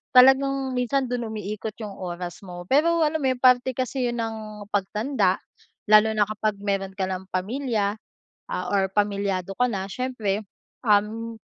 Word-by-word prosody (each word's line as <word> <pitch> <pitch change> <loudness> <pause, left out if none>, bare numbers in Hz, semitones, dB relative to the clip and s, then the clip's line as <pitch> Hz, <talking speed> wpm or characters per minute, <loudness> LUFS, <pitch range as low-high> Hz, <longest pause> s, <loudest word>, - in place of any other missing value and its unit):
talagang 270 +1 +6
minsan 260 +2 +1
dun 240 -2 -2
umiikot 215 0 -5
yung 210 - -5
oras 175 -1 -5
mo 175 -1 -8
pero 330 +4 +4
alam 310 +1 +1
mo 265 - +1
yung 250 - -4
parte 250 0 +5
kasi 255 -1 -1
yun 240 - -2
ng 215 -2 -6
pagtanda. 210 +7 +1 0.5
Lalo 215 +1 +7
na 210 - +4
kapag 215 0 -1
meron 195 -1 -2
ka 190 - 0
ng 185 0 -4
pamilya, 210 +1 -1 0.6
ah, 180 - -2
or 195 -1 +2
pamilyado 200 -2 0
ka 250 - +3
na 195 -1 -3
siyempre, 220 -3 -2 0.4
um, 220 +2 +2
215 Hz, 155 wpm, -25 LUFS, 200-255 Hz, 0.6 s, Lalo